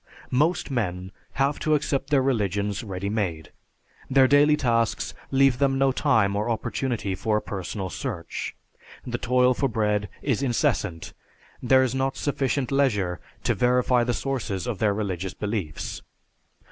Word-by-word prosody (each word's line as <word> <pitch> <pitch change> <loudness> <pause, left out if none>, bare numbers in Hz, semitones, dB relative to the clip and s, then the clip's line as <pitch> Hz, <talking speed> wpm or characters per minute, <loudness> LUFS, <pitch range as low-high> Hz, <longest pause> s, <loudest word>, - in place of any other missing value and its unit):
Most 150 +4 +1
men 95 -7 -2 0.2
have 140 +2 +1
to 155 0 +2
accept 140 -2 -1
their 140 -3 +3
religions 105 -5 0
ready 100 -2 -4
made. 95 -7 -2 0.6
Their 130 0 +5
daily 145 +2 +5
tasks 115 -4 0 0.2
leave 135 -2 +3
them 135 -1 +2
no 135 0 +3
time 110 -8 +2
or 105 +3 -1
opportunity 115 -2 -2
for 105 +2 0
a - - +1
personal 95 -1 -5
search. 95 -11 -5 0.5
The 120 -1 -3
toil 125 +1 +3
for 135 +2 0
bread 105 -2 0
is 135 -3 0
incessant, 90 -9 -1 0.5
there 130 +1 +5
is 130 -2 0
not 135 0 -1
sufficient 140 -2 -1
leisure 105 -11 +1 0.2
to - - +2
verify 125 0 +3
the 120 0 0
sources 120 -8 -3
of 120 -5 -3
their 105 -2 +2
religious 95 -3 -3
beliefs. 100 -8 -4
120 Hz, 145 wpm, -25 LUFS, 100-135 Hz, 0.6 s, Their